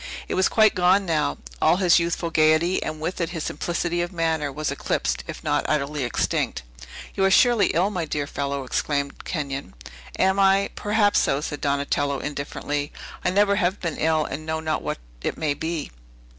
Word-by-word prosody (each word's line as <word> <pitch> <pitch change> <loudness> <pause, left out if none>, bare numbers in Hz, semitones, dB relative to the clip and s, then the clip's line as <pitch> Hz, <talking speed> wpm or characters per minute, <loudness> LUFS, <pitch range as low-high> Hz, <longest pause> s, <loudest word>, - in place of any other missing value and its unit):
It - - -3
was 185 - +3
quite 215 -2 +5
gone 185 +1 +3
now. 155 - 0 0.2
All 160 - +5
his 180 -3 +5
youthful 170 0 -1
gayety, 155 +3 +3
and 155 - -4
with 175 +4 -3
it 165 - 0
his 165 -3 -4
simplicity 175 +2 -2
of 175 - -3
manner, 160 -4 0
was 150 +2 -2
eclipsed, - - -1
if - - -7
not - - +1
utterly 150 -1 0
extinct. 120 - -1 0.5
"You 195 - 0
are 195 - +5
surely 225 0 +5
ill, 185 +5 +1
my 180 -5 -2
dear 150 -2 -2
fellow," 140 -1 -3
exclaimed 140 +2 -2
Kenyon. 140 - -4 0.4
"Am 190 +1 +2
I? 195 0 +4
Perhaps 205 -1 +2
so," 135 - +1
said 150 -1 -5
Donatello 140 0 0
indifferently; 145 0 -3 0.3
"I - - +2
never 200 +2 +3
have 190 0 +1
been 170 -4 -3
ill, 155 -1 +2
and 155 - -5
know 160 0 -2
not 155 0 -1
what - - -3 0.2
it - - -2
may 155 -2 0
be." 160 +1 -4
160 Hz, 185 wpm, -24 LUFS, 145-185 Hz, 0.5 s, quite